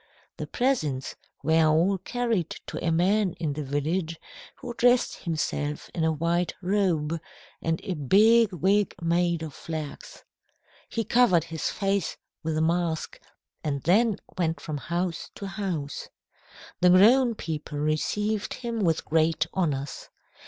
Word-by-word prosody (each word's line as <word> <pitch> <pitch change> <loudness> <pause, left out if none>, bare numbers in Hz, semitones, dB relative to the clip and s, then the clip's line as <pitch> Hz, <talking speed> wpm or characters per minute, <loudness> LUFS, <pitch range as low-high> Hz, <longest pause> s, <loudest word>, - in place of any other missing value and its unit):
The - - -5
presents 155 - -1 0.3
were 160 0 +4
all 170 +5 +3
carried 225 -4 -1 0.2
to - - -6
a 170 - +1
man 185 +3 +2
in 155 -3 -3
the 150 +1 -4
village 160 +4 -2 0.4
who 245 - -7
dressed 245 +1 +2
himself 150 -2 -2
in 165 - -1
a 160 - +3
white 170 +3 0
robe, 175 -5 0 0.4
and 165 0 0
a 190 - -2
big 210 - +5
wig 195 +3 +1
made 170 -1 +1
of 155 -3 -6
flax. 155 -2 -7 0.7
He 230 - -1
covered 225 -9 +4
his 165 -1 -3
face 195 -2 -1 0.2
with 160 -1 -2
a - - +1
mask, 165 -1 -1 0.4
and 140 -3 -2
then 210 +5 +3 0.2
went 165 -2 0
from 155 -2 -4
house 170 +4 -3
to 200 - -7
house. 185 -8 -4 0.7
The 180 - +5
grown 230 +7 +6
people 155 -5 -5
received 205 +8 -1
him 235 -2 -4
with 165 -6 +1
great 160 0 +2
honours. 145 -7 -2
170 Hz, 140 wpm, -26 LUFS, 155-200 Hz, 0.7 s, grown